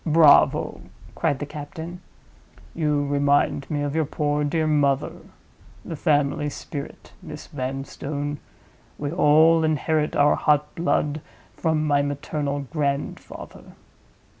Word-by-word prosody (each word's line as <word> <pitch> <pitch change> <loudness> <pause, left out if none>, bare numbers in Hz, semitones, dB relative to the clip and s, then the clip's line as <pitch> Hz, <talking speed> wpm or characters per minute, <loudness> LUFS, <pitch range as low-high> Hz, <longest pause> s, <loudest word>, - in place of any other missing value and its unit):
"Bravo!" 155 -2 +4 0.3
cried 140 - 0
the 145 - -4
captain. 160 +4 -8 0.7
"You 150 -3 0
remind 140 -1 +1
me 145 -2 -1
of 145 +1 -2
your 160 -1 +2
poor 150 -1 -1
dear 160 +2 0
mother. 145 -2 +2 0.7
The 165 - -5
family 145 -1 +1
spirit, 145 0 -8
Miss 155 -4 -9
Vanstone. 140 +2 -4 0.6
We 145 -1 -3
all 160 0 +5
inherit 155 0 0
our 145 0 +5
hot 150 0 +1
blood 155 -3 0 0.3
from 160 -2 0
my 145 -1 +3
maternal 145 0 -2
grandfather." 140 0 -4
150 Hz, 115 wpm, -24 LUFS, 145-155 Hz, 0.7 s, all